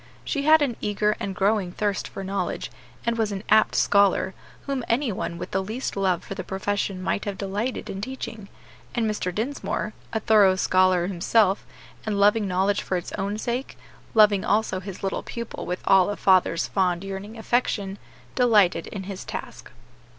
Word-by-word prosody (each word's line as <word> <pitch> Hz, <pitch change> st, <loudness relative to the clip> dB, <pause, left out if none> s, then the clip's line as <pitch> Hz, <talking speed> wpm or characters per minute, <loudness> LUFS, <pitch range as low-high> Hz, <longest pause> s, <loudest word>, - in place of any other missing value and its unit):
She 285 Hz, -, -1 dB
had 310 Hz, 0 st, +6 dB
an 245 Hz, -5 st, -1 dB
eager 210 Hz, +1 st, +1 dB
and 195 Hz, -1 st, -4 dB
growing 195 Hz, -2 st, +1 dB
thirst 205 Hz, -1 st, -1 dB
for 195 Hz, -, -7 dB
knowledge, 195 Hz, +1 st, -3 dB, 0.3 s
and 235 Hz, 0 st, 0 dB
was 215 Hz, -2 st, +1 dB
an 195 Hz, 0 st, -4 dB
apt 215 Hz, +1 st, +5 dB
scholar, 200 Hz, -1 st, +3 dB, 0.3 s
whom 275 Hz, -3 st, -2 dB
any 240 Hz, +1 st, +1 dB
one 170 Hz, -3 st, -4 dB
with -, -, -6 dB
the 190 Hz, -, +1 dB
least 220 Hz, +7 st, -4 dB
love 190 Hz, -3 st, +1 dB
for -, -, -6 dB
the 195 Hz, -, -5 dB
profession 195 Hz, -1 st, -2 dB
might 200 Hz, -, -1 dB
have 200 Hz, -2 st, -3 dB
delighted 205 Hz, +6 st, -3 dB
in 195 Hz, -, -5 dB
teaching; 225 Hz, -4 st, -6 dB, 0.5 s
and 230 Hz, -2 st, +1 dB
Mr. 210 Hz, -4 st, -2 dB
Dinsmore, 220 Hz, 0 st, -3 dB, 0.2 s
a 220 Hz, -, 0 dB
thorough 205 Hz, -4 st, +5 dB
scholar 185 Hz, -1 st, +3 dB
himself, 195 Hz, +2 st, +2 dB, 0.4 s
and 210 Hz, -2 st, -1 dB
loving 210 Hz, +1 st, +4 dB
knowledge 195 Hz, +2 st, +1 dB
for 185 Hz, -, -1 dB
its 175 Hz, -, -6 dB
own 200 Hz, +1 st, -2 dB
sake 240 Hz, +4 st, -3 dB, 0.4 s
loving 210 Hz, -3 st, +6 dB
also 210 Hz, -2 st, +1 dB
his 190 Hz, 0 st, -8 dB
little 195 Hz, -, -1 dB
pupil 235 Hz, 0 st, -6 dB
with 180 Hz, +1 st, -3 dB
all 190 Hz, 0 st, +5 dB
a 205 Hz, -, -2 dB
father's 185 Hz, -3 st, +3 dB
fond, 180 Hz, -2 st, 0 dB
yearning 195 Hz, +3 st, -6 dB
affection 210 Hz, -4 st, -1 dB, 0.3 s
delighted 215 Hz, -8 st, +3 dB
in 195 Hz, -2 st, -6 dB
his 190 Hz, 0 st, -6 dB
task. -, -, -7 dB
200 Hz, 175 wpm, -25 LUFS, 190-220 Hz, 0.5 s, had